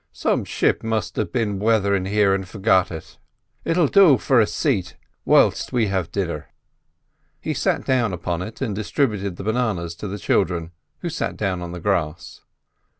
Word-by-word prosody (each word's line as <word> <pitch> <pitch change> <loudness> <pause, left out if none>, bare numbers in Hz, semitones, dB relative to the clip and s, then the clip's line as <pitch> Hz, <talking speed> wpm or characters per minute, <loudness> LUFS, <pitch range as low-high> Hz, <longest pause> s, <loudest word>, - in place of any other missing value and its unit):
"Some - - 0
ship - - +1
must 110 -5 -2
have 110 - -1
been 105 -6 -1
wathering 100 -3 +2
here 100 0 +3
an' 95 0 -1
forgot 95 -1 +2
it. 80 -2 -9 0.4
It'll 170 0 +2
do 175 -5 +6
for 130 0 +3
a 110 - +4
sate 90 -3 -1 0.3
whilst - - +3
we 115 -4 +1
have 95 -4 -2
dinner." 85 -7 -3 0.9
He - - -3
sat - - 0
down 125 -5 +2
upon 85 -1 -3
it 110 +7 -8
and 120 -6 -1
distributed 100 - -1
the 95 - -8
bananas 110 -7 -1
to 105 - -5
the 100 +2 -5
children, 85 -3 0 0.3
who - - -3
sat - - -3
down 95 -3 -1
on 85 -1 -6
the 90 - -6
grass. 90 -1 -2
100 Hz, 170 wpm, -22 LUFS, 90-110 Hz, 0.9 s, do